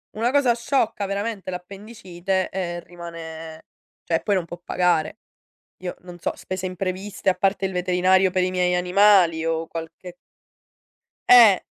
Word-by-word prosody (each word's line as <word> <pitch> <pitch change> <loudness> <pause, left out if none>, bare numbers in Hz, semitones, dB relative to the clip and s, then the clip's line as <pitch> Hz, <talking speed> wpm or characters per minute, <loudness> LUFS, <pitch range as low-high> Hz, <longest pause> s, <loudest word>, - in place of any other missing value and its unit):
una 230 +3 0
cosa 270 -4 +3
sciocca 230 -4 -1
veramente, 200 0 -4
l'appendicite 190 0 -4
e 175 -2 -4
rimane 165 -2 -9 0.4
cioè 165 - 0
poi 205 - 0
non 185 - 0
può 175 0 -9
pagare. 175 -4 0 0.6
Io 180 - -4
non 175 -1 -12
so - - -2
spese 185 0 -6
impreviste 185 +2 -4
a 185 - +5
parte 195 0 0
il 190 - -5
veterinario 185 +1 +2
per 185 0 0
i 185 - 0
miei 180 -1 +1
animali 180 -2 +4
o 165 0 -1
qualche 165 +2 -8 1.1
Eh. 230 -6 +8
185 Hz, 145 wpm, -23 LUFS, 175-200 Hz, 1.1 s, Eh